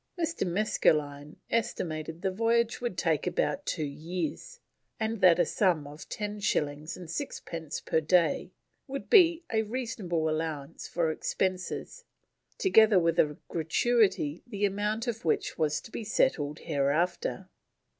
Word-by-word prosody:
Mr. 330 Hz, -, -1 dB
Maskelyne 150 Hz, -6 st, +1 dB, 0.2 s
estimated 165 Hz, -7 st, -2 dB
the 190 Hz, -, +1 dB
voyage 230 Hz, +4 st, +1 dB
would 240 Hz, -8 st, -3 dB
take 165 Hz, -1 st, +1 dB
about 275 Hz, +11 st, -1 dB
two 155 Hz, -4 st, -1 dB
years, 165 Hz, -, -5 dB, 0.4 s
and 220 Hz, -1 st, -2 dB
that 180 Hz, -2 st, +7 dB
a -, -, +3 dB
sum 175 Hz, -7 st, +1 dB
of 145 Hz, +2 st, -11 dB
ten 210 Hz, 0 st, -4 dB
shillings 150 Hz, -4 st, -1 dB
and 180 Hz, -2 st, -9 dB
six 270 Hz, -, -4 dB
pence 160 Hz, -3 st, -6 dB
per 160 Hz, -, 0 dB
day 170 Hz, +2 st, +2 dB, 0.4 s
would 275 Hz, 0 st, -6 dB
be 345 Hz, -5 st, +6 dB
a 220 Hz, -, +3 dB
reasonable 215 Hz, -8 st, -2 dB
allowance 155 Hz, -1 st, -3 dB
for 165 Hz, -2 st, 0 dB
expenses, 185 Hz, -, -3 dB, 0.5 s
together 220 Hz, -, +5 dB
with 165 Hz, -2 st, +2 dB
a 150 Hz, -1 st, +3 dB
gratuity 175 Hz, -1 st, +1 dB
the 205 Hz, -3 st, -1 dB
amount 210 Hz, +3 st, -1 dB
of 230 Hz, -2 st, -3 dB
which 160 Hz, -, 0 dB
was 150 Hz, -1 st, +1 dB
to -, -, -13 dB
be -, -, -5 dB
settled 155 Hz, -, +1 dB
hereafter. 160 Hz, -, 0 dB
180 Hz, 140 wpm, -29 LUFS, 155-225 Hz, 0.5 s, that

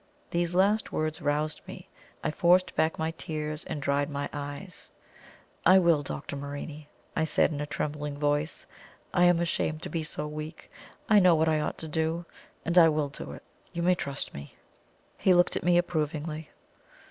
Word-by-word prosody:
These 175 Hz, 0 st, 0 dB
last 205 Hz, +4 st, +3 dB
words 155 Hz, 0 st, -2 dB
roused 150 Hz, +1 st, 0 dB
me. -, -, -9 dB, 0.4 s
I -, -, 0 dB
forced 175 Hz, +3 st, +3 dB
back 160 Hz, +1 st, +1 dB
my 160 Hz, 0 st, -1 dB
tears, 155 Hz, -2 st, -4 dB
and -, -, -4 dB
dried 140 Hz, +1 st, 0 dB
my 145 Hz, -1 st, -3 dB
eyes. 145 Hz, +5 st, -7 dB, 0.7 s
"I 185 Hz, +3 st, +7 dB
will, 170 Hz, -5 st, +4 dB
Dr. 140 Hz, 0 st, -5 dB
Morini," 145 Hz, +2 st, -6 dB, 0.3 s
I 160 Hz, -, +2 dB
said, 160 Hz, 0 st, +2 dB
in 145 Hz, -1 st, -3 dB
a 150 Hz, -, -3 dB
trembling 150 Hz, 0 st, -3 dB
voice. 145 Hz, +1 st, 0 dB, 0.5 s
"I 175 Hz, -, +5 dB
am 175 Hz, -1 st, +5 dB
ashamed 160 Hz, -2 st, -1 dB
to -, -, -4 dB
be 165 Hz, -, -2 dB
so 150 Hz, -1 st, -4 dB
weak. 155 Hz, +2 st, -7 dB, 0.4 s
I 215 Hz, -2 st, +7 dB
know 180 Hz, -3 st, +6 dB
what 160 Hz, +1 st, +2 dB
I 155 Hz, -1 st, +3 dB
ought 150 Hz, -, -2 dB
to 160 Hz, -, -6 dB
do, 160 Hz, +2 st, -1 dB, 0.4 s
and 170 Hz, +2 st, +5 dB
I 165 Hz, -1 st, +8 dB
will 150 Hz, -2 st, 0 dB
do 145 Hz, -, -8 dB
it. -, -, -11 dB, 0.3 s
You 170 Hz, -1 st, -2 dB
may 180 Hz, +1 st, +5 dB
trust 140 Hz, -5 st, -4 dB
me." 70 Hz, 0 st, -9 dB, 0.6 s
He 185 Hz, -, +5 dB
looked 175 Hz, 0 st, +4 dB
at -, -, -2 dB
me 175 Hz, 0 st, +4 dB
approvingly. 155 Hz, -2 st, -1 dB
155 Hz, 180 wpm, -28 LUFS, 150-170 Hz, 0.7 s, I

